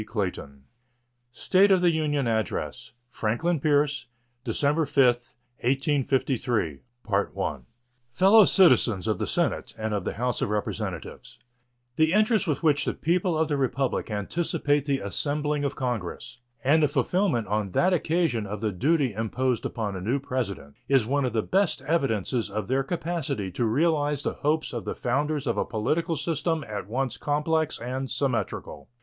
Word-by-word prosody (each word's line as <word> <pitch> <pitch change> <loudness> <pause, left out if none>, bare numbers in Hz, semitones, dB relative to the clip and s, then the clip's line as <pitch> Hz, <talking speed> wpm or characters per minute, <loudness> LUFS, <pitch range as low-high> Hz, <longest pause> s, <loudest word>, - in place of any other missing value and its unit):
State 190 +9 +3
of 190 -2 +5
the 175 -1 +4
Union 150 -4 0
Address 110 -4 -2
Franklin 125 +9 -1
Pierce 145 -3 +1 0.4
December 145 +6 +1
5, 135 -2 +4 0.6
1853 130 - 0 1.3
Fellow 195 - +6
Citizens 120 - +4
of 105 -4 0
the - - -1
Senate - - -1
and 110 -1 -2
of 100 -3 -1
the - - -3
House 125 +2 -2
of - - 0
Representatives: 105 -4 -4 0.6
The 160 +1 +3
interest 215 -1 +3
with 150 0 -1
which 145 -2 +3
the - - -1
people 170 0 0
of 160 0 +2
the 145 -2 0
Republic 135 -1 -1
anticipate 145 - 0
the 140 -1 +2
assembling 145 - -1
of 140 0 -2
Congress 120 -5 -4 0.2
and 155 +4 +4
the 150 - +4
fulfillment 145 - +1
on 105 0 -1
that 185 +1 +3
occasion 160 - 0
of 105 +2 -5
the 110 0 -1
duty 135 - +1
imposed 115 +3 -1
upon 105 -4 -4
a 95 - -5
new 115 +9 0
President 120 - -4
is 135 -5 +3
one 140 +3 +1
of 125 - -2
the 110 -2 +1
best 190 -7 +1
evidences 130 - 0
of 105 +2 -4
their 130 +3 +1
capacity 150 - -3
to 120 - -1
realize 145 +3 +1
the - - -1
hopes 155 +2 -1
of - - -4
the - - -4
founders 145 +3 -1
of 115 -5 -1
a - - +2
political 150 +10 -1
system 160 +1 -1
at 105 -2 -5
once 130 +3 -2
complex 150 +1 0
and 130 +2 -4
symmetrical. 120 - -3
135 Hz, 155 wpm, -26 LUFS, 115-155 Hz, 1.3 s, Fellow